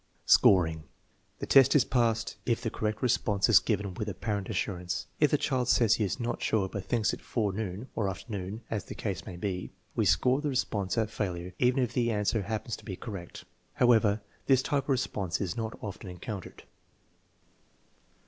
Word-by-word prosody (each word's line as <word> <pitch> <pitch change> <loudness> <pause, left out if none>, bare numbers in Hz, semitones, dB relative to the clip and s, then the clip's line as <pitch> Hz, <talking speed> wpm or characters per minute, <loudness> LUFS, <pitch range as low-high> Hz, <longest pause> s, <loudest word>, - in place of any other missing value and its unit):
Scoring. 80 -5 +5 0.5
The - - -4
test 135 0 +6
is 145 - +5
passed 115 -3 +1
if 115 -2 +1
the 115 -2 -3
correct 110 +1 -2
response 110 -5 +2
is 115 - +8
given 100 -3 -1
\gith 105 +4 -4
apparent^auianjcg.^ 95 -3 -3
If 150 - +5
the 150 - +3
child 130 -4 0
says 115 -3 +4
he 110 - 0
is 95 - -2
not 120 0 -3
sure 100 -3 +1
but 95 0 -6
thinks 115 -3 +1
it - - -6
forenoon 105 0 -2
(or 100 -3 0
afternoon, 100 +2 -5
as 110 -2 -2
the - - -8
case 95 -6 -4
may 90 - -6
be), 90 0 -3 0.3
we 110 -4 +1
score 125 - +3
the 150 - -1
response 105 -7 -1
a 115 - +3
failure 90 -4 -4
even 125 +1 +3
if 120 -1 -3
the 120 -2 +1
answer 105 0 +1
hap 110 +2 -3
pens 120 - -3
to - - -16
be 95 - -5
correct. 95 -4 -8 0.3
However, 110 -4 +4 0.3
this 130 -1 +4
type 140 -3 0
of - - -13
response 100 -9 -1
is 95 -2 -2
not 110 -1 -4
often 100 -2 -6
encountered. 90 +2 -7
110 Hz, 185 wpm, -29 LUFS, 95-120 Hz, 0.5 s, is